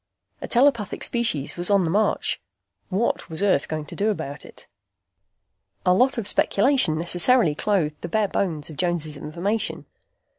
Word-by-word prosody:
A -, -, -5 dB
telepathic 240 Hz, -5 st, +2 dB
species 225 Hz, -, 0 dB
was 175 Hz, +2 st, -1 dB
on 200 Hz, -2 st, +4 dB
the 165 Hz, -, -1 dB
march. 210 Hz, +4 st, 0 dB, 0.5 s
What 205 Hz, +2 st, -1 dB
was 160 Hz, +4 st, -2 dB
Earth 185 Hz, -8 st, +2 dB
going 155 Hz, -1 st, -4 dB
to -, -, -9 dB
do 210 Hz, +2 st, +1 dB
about 145 Hz, -9 st, -4 dB
it? -, -, -14 dB, 1.2 s
A 180 Hz, -, +5 dB
lot 255 Hz, +7 st, +3 dB
of 220 Hz, -4 st, -2 dB
speculation 205 Hz, -, +2 dB
necessarily 175 Hz, +3 st, +3 dB
clothed 155 Hz, -3 st, -1 dB
the -, -, -4 dB
bare 215 Hz, +4 st, +1 dB
bones 160 Hz, -6 st, -2 dB
of 150 Hz, -, -11 dB
Jones' 170 Hz, -3 st, -1 dB
information. 190 Hz, +10 st, -3 dB
185 Hz, 155 wpm, -23 LUFS, 155-215 Hz, 1.2 s, A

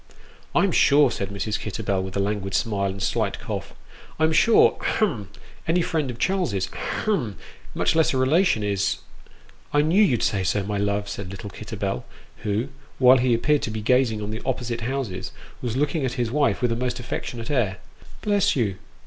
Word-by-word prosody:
" -, -, -26 dB
I'm 200 Hz, -, +4 dB
sure," 145 Hz, -4 st, +5 dB
said 100 Hz, -, -3 dB
Mrs. 100 Hz, +2 st, -2 dB
Kitterbell, 100 Hz, -2 st, -2 dB
with 95 Hz, 0 st, -5 dB
a -, -, +1 dB
languid 100 Hz, -1 st, -1 dB
smile, 100 Hz, -4 st, 0 dB
and 95 Hz, -, -5 dB
a -, -, -8 dB
slight -, -, 0 dB
cough. -, -, -6 dB, 0.2 s
" -, -, -21 dB
I'm 160 Hz, 0 st, +3 dB
sure 220 Hz, +8 st, +5 dB
hem 125 Hz, -, 0 dB, 0.4 s
any 170 Hz, +2 st, +2 dB
friend 155 Hz, -5 st, -1 dB
of 120 Hz, -, -5 dB
Charles's 150 Hz, -, 0 dB
hem 130 Hz, -, -2 dB, 0.4 s
much -, -, +2 dB
less 160 Hz, -1 st, +4 dB
a 130 Hz, -, 0 dB
relation, 135 Hz, -, +3 dB
is 100 Hz, -1 st, 0 dB, 0.4 s
" -, -, -28 dB
I 145 Hz, -, +5 dB
knew 170 Hz, +7 st, +4 dB
you'd 130 Hz, -, +3 dB
say 95 Hz, -2 st, +1 dB
so, 100 Hz, +2 st, +1 dB
my 100 Hz, +1 st, -2 dB
love," 100 Hz, 0 st, 0 dB
said 100 Hz, -2 st, -5 dB
little 100 Hz, +1 st, -7 dB
Kitterbell, 60 Hz, -, -4 dB, 0.3 s
who, 105 Hz, +6 st, -2 dB, 0.3 s
while 130 Hz, 0 st, +7 dB
he 125 Hz, -1 st, +3 dB
appeared 145 Hz, +5 st, +2 dB
to -, -, -2 dB
be 110 Hz, 0 st, -4 dB
gazing 120 Hz, -3 st, +2 dB
on 105 Hz, -, -4 dB
the 110 Hz, -, -5 dB
opposite 120 Hz, -2 st, -2 dB
houses, 120 Hz, -6 st, -3 dB, 0.3 s
was 120 Hz, -1 st, -2 dB
looking 150 Hz, +2 st, 0 dB
at 130 Hz, -2 st, -1 dB
his 120 Hz, -3 st, -1 dB
wife 140 Hz, -2 st, +1 dB
with 120 Hz, -, +2 dB
a -, -, +1 dB
most 125 Hz, +1 st, -2 dB
affectionate 120 Hz, 0 st, -5 dB
air: 110 Hz, -9 st, +1 dB, 0.2 s
" -, -, -19 dB
Bless 205 Hz, -2 st, +2 dB
you 105 Hz, -8 st, 0 dB
120 Hz, 200 wpm, -24 LUFS, 100-145 Hz, 0.4 s, while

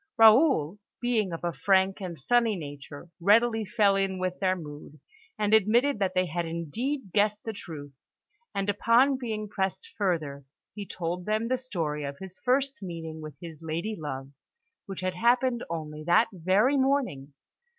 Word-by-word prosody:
Raoul, 220 Hz, -, +5 dB, 0.2 s
being 230 Hz, -6 st, 0 dB
of 165 Hz, 0 st, -6 dB
a 170 Hz, -1 st, -1 dB
frank 190 Hz, +1 st, +2 dB
and 175 Hz, -3 st, -5 dB
sunny 230 Hz, -, +2 dB
nature, 145 Hz, 0 st, -9 dB
readily 225 Hz, +4 st, +4 dB
fell 205 Hz, -1 st, +3 dB
in 195 Hz, -1 st, 0 dB
with 185 Hz, 0 st, -3 dB
their 185 Hz, -1 st, +2 dB
mood, 150 Hz, -2 st, -10 dB, 0.4 s
and 210 Hz, 0 st, +1 dB
admitted 220 Hz, +5 st, +4 dB
that 190 Hz, -2 st, 0 dB
they 185 Hz, 0 st, +3 dB
had 175 Hz, +1 st, -2 dB
indeed 190 Hz, -, -3 dB
guessed 210 Hz, 0 st, +2 dB
the 225 Hz, -, -4 dB
truth; 150 Hz, -8 st, -9 dB, 0.6 s
and 195 Hz, 0 st, -1 dB
upon 235 Hz, +6 st, +3 dB
being 215 Hz, -4 st, -3 dB
pressed 200 Hz, -, -3 dB
further, 160 Hz, -8 st, -1 dB, 0.3 s
he 205 Hz, -2 st, -7 dB
told 175 Hz, +1 st, -4 dB
them 215 Hz, +2 st, 0 dB
the 255 Hz, -, +3 dB
story 165 Hz, -, -3 dB
of 140 Hz, 0 st, -5 dB
his 190 Hz, +1 st, -10 dB
first 265 Hz, -1 st, 0 dB
meeting 165 Hz, -4 st, -6 dB
with 155 Hz, -1 st, -8 dB
his 165 Hz, -4 st, -9 dB
lady 165 Hz, +7 st, -3 dB
love, 135 Hz, -5 st, -6 dB, 0.6 s
which 195 Hz, -2 st, -6 dB
had 185 Hz, 0 st, -1 dB
happened 240 Hz, +4 st, +2 dB
only 155 Hz, -2 st, -5 dB
that 175 Hz, +8 st, +4 dB
very 195 Hz, -, +3 dB
morning. 260 Hz, -, 0 dB
190 Hz, 160 wpm, -28 LUFS, 165-225 Hz, 0.6 s, Raoul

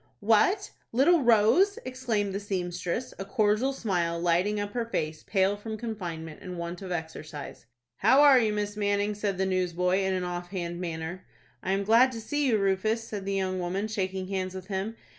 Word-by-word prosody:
"What, 225 Hz, -, +3 dB, 0.2 s
little 290 Hz, +8 st, +4 dB
Rose!" 240 Hz, -, +4 dB
exclaimed 235 Hz, -6 st, -1 dB
the 200 Hz, -, -2 dB
seamstress, 180 Hz, +2 st, -3 dB
a -, -, -2 dB
cordial 215 Hz, +4 st, +2 dB
smile 175 Hz, -9 st, -1 dB
lighting 175 Hz, +5 st, +1 dB
up 205 Hz, 0 st, -3 dB
her 240 Hz, -, 0 dB
face, 155 Hz, -8 st, -2 dB
pale 195 Hz, 0 st, +1 dB
from 220 Hz, +1 st, -6 dB
confinement 175 Hz, -9 st, -6 dB
and 180 Hz, -2 st, -7 dB
want 170 Hz, +1 st, -5 dB
of 190 Hz, -2 st, -6 dB
exercise. 155 Hz, -6 st, -6 dB, 0.3 s
"How 275 Hz, +3 st, +5 dB
are 280 Hz, -3 st, +8 dB
you, 220 Hz, -3 st, +2 dB
Miss 210 Hz, 0 st, -2 dB
Manning?" 205 Hz, 0 st, 0 dB
said 205 Hz, -2 st, -2 dB
the 190 Hz, -, +1 dB
newsboy, 180 Hz, 0 st, +1 dB
in 190 Hz, -1 st, 0 dB
an 185 Hz, -, -1 dB
off 175 Hz, 0 st, -4 dB
hand 175 Hz, -2 st, -4 dB
manner. 165 Hz, +1 st, -5 dB, 0.4 s
"I 190 Hz, -, -1 dB
am 195 Hz, +1 st, 0 dB
glad 230 Hz, +5 st, +5 dB
to 230 Hz, -, -5 dB
see 290 Hz, +6 st, -1 dB
you, 230 Hz, -4 st, +3 dB
Rufus," 200 Hz, +3 st, +1 dB
said 205 Hz, -3 st, -5 dB
the 195 Hz, 0 st, -1 dB
young 185 Hz, -1 st, -1 dB
woman, 185 Hz, +4 st, -2 dB
shaking 190 Hz, -3 st, -2 dB
hands 185 Hz, -1 st, -2 dB
with 185 Hz, +1 st, -8 dB
him. 200 Hz, +3 st, -3 dB
195 Hz, 190 wpm, -28 LUFS, 180-220 Hz, 0.4 s, are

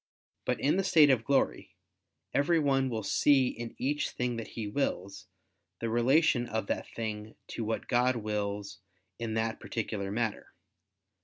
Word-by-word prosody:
But -, -, 0 dB
in 145 Hz, +6 st, +2 dB
the 195 Hz, -, +2 dB
state 155 Hz, -6 st, +6 dB
of 120 Hz, -4 st, +2 dB
glory, 140 Hz, +1 st, 0 dB, 0.6 s
every 165 Hz, +4 st, +3 dB
one 135 Hz, -3 st, +2 dB
will 110 Hz, -3 st, -3 dB
see 135 Hz, +4 st, +4 dB
in 120 Hz, -1 st, -7 dB
each 145 Hz, +3 st, 0 dB
thing 125 Hz, -1 st, -2 dB
that 115 Hz, -, -5 dB
he 110 Hz, -, -2 dB
wills, 105 Hz, -4 st, -3 dB, 0.5 s
the 115 Hz, -, -2 dB
relation 120 Hz, +2 st, +3 dB
of 110 Hz, -1 st, -2 dB
that -, -, -2 dB
thing 110 Hz, -1 st, -5 dB
to 115 Hz, -, -4 dB
what 110 Hz, +1 st, -3 dB
God 125 Hz, +1 st, +3 dB
wills 105 Hz, -2 st, -3 dB, 0.4 s
in 115 Hz, -1 st, -3 dB
that 110 Hz, 0 st, -1 dB
particular 105 Hz, -3 st, -3 dB
matter. 110 Hz, 0 st, -2 dB
115 Hz, 155 wpm, -30 LUFS, 110-135 Hz, 0.6 s, state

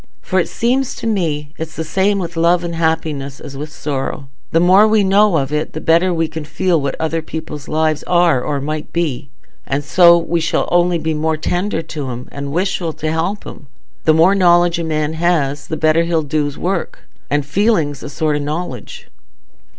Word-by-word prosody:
For 185 Hz, -, 0 dB
it 175 Hz, -, 0 dB
seems 255 Hz, +3 st, 0 dB
to -, -, -7 dB
me 160 Hz, -9 st, -1 dB
it's 160 Hz, -1 st, -6 dB
the 160 Hz, -, -3 dB
same 195 Hz, +5 st, +1 dB
with 170 Hz, -3 st, -4 dB
love 170 Hz, +2 st, +3 dB
and 170 Hz, -1 st, -4 dB
happiness 160 Hz, -4 st, -2 dB
as 140 Hz, -, -9 dB
with 150 Hz, +2 st, -6 dB
sorrow—the 140 Hz, +1 st, -3 dB
more 185 Hz, +5 st, +6 dB
we 215 Hz, -1 st, +3 dB
know 195 Hz, -1 st, +4 dB
of 140 Hz, 0 st, -2 dB
it 150 Hz, +1 st, -2 dB
the 155 Hz, -, -4 dB
better 170 Hz, +3 st, +3 dB
we 165 Hz, -2 st, 0 dB
can 160 Hz, 0 st, -6 dB
feel 170 Hz, +1 st, 0 dB
what 140 Hz, -1 st, -2 dB
other 160 Hz, 0 st, -1 dB
people's 160 Hz, -3 st, -7 dB
lives 155 Hz, -1 st, 0 dB
are 175 Hz, -7 st, +3 dB
or 145 Hz, +2 st, -2 dB
might 150 Hz, +2 st, -4 dB
be, 150 Hz, -6 st, -2 dB, 0.4 s
and 140 Hz, +2 st, -1 dB
so 170 Hz, +3 st, +6 dB
we 170 Hz, 0 st, -1 dB
shall 165 Hz, -, 0 dB
only 175 Hz, 0 st, +3 dB
be 160 Hz, 0 st, -2 dB
more 155 Hz, +1 st, 0 dB
tender 175 Hz, +2 st, -1 dB
to 150 Hz, -4 st, -5 dB
'em, 125 Hz, +1 st, -6 dB
and 140 Hz, 0 st, -5 dB
wishful 175 Hz, -1 st, -1 dB
to 155 Hz, +1 st, -3 dB
help 170 Hz, +6 st, -2 dB
'em. 145 Hz, -, -10 dB, 0.4 s
The 155 Hz, -, +5 dB
more 165 Hz, +4 st, +5 dB
knowledge 175 Hz, -2 st, +4 dB
a -, -, -2 dB
man 155 Hz, -1 st, -1 dB
has, 160 Hz, -4 st, 0 dB
the 160 Hz, -, -3 dB
better 155 Hz, +1 st, +3 dB
he'll 165 Hz, -1 st, 0 dB
do's 145 Hz, -1 st, -2 dB
work; 185 Hz, 0 st, -3 dB, 0.2 s
and 145 Hz, -1 st, 0 dB
feeling's 155 Hz, -, +1 dB
a -, -, -7 dB
sort 155 Hz, +1 st, -1 dB
o' -, -, -1 dB
knowledge." 145 Hz, -5 st, -5 dB
160 Hz, 195 wpm, -17 LUFS, 150-175 Hz, 0.4 s, more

